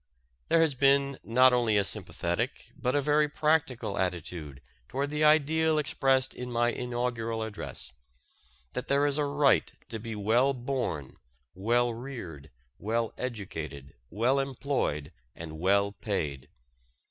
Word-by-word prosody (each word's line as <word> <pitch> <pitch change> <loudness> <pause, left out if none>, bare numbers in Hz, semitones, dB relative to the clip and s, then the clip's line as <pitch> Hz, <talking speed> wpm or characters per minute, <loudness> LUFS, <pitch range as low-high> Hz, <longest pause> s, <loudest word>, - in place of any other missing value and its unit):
There 165 - +4
has 160 -3 +3
been 140 +1 +3
not 125 +2 +5
only 115 -4 +3
a 100 - +4
sympathetic 95 +5 -1
but 125 0 -1
a 145 - +3
very 150 +1 +3
practical 150 -9 0
attitude 85 -6 -3 0.3
toward 140 +2 -2
the 150 0 0
ideal 155 +1 +4
expressed 135 -3 +2
in 125 0 -6
my 120 0 +2
inaugural 120 -2 -2
address, 105 - -7 0.8
that 125 - -4
there 140 +1 +3
is 145 0 +2
a 150 - +2
right 145 -1 +3 0.2
to 110 - -4
be 115 0 -6
well 120 +7 +2
born, 120 - -3 0.4
well 120 +6 +1
reared, 115 - -8 0.3
well 115 +2 -1
educated, 80 - -6 0.2
well 120 - +2
employed, 135 - -2 0.2
and 80 -1 -8
well 100 +3 +3
paid. 75 - -4
120 Hz, 135 wpm, -29 LUFS, 100-140 Hz, 0.8 s, not